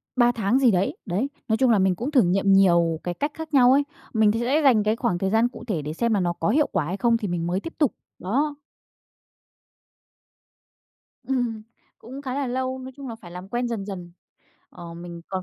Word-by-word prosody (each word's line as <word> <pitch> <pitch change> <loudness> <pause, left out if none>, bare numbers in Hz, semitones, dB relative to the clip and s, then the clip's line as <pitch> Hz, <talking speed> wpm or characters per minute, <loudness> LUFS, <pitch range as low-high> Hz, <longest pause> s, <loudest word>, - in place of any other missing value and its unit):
3 240 -1 +4
tháng 230 +1 +1
gì 255 -4 +5
đấy. 190 0 0
Đấy. 200 +10 -1 0.2
Nói 220 - +1
chung 260 0 +3
là 215 - +4
mình 190 -1 +2
cũng 245 - -4
thử 270 -4 +5
nghiệm 195 +1 +2
nhiều 170 -4 +4
cái 175 - -2
cách 290 - -2
khác 320 -1 -8
nhau 250 -2 +6
ấy. 280 +2 +4 0.3
Mình 220 -2 +4
th - - -2
sẽ 265 +6 +1
dành 240 -7 +5
cái 215 +1 +1
khoảng 180 -6 -1
thời 190 +2 -1
gian 225 +3 +3
cụ 240 - -11
thể 185 -9 -1
để 150 +1 -5
xem 235 +6 0
là 205 - +2
nó 175 -2 0
có 165 - -2
hiệu 290 +7 +3
quả 150 - 0
hay 180 +5 -3
không 230 +3 +2
thì 220 -3 -4
mình 170 -2 -2
mới 180 +2 0
tiếp 330 - -8
tục. 295 -6 +2 0.3
Đó. 285 +10 -1 2.7
Ừm. 245 -4 -2 0.4
Cũng 265 +5 -10
khá 260 -2 -4
là 280 0 -1
lâu, 260 +1 -2
nói 260 0 -9
chung 275 -2 -8
là 230 - -5
phải 200 -6 -13
làm 180 +2 -9
quen 240 +3 -2
dần 225 -4 -3
dần. 180 -4 -7 0.6
Ờ, 170 -1 -10
mình 170 0 -9
còn 190 -1 -3
220 Hz, 230 wpm, -24 LUFS, 180-255 Hz, 2.7 s, nhau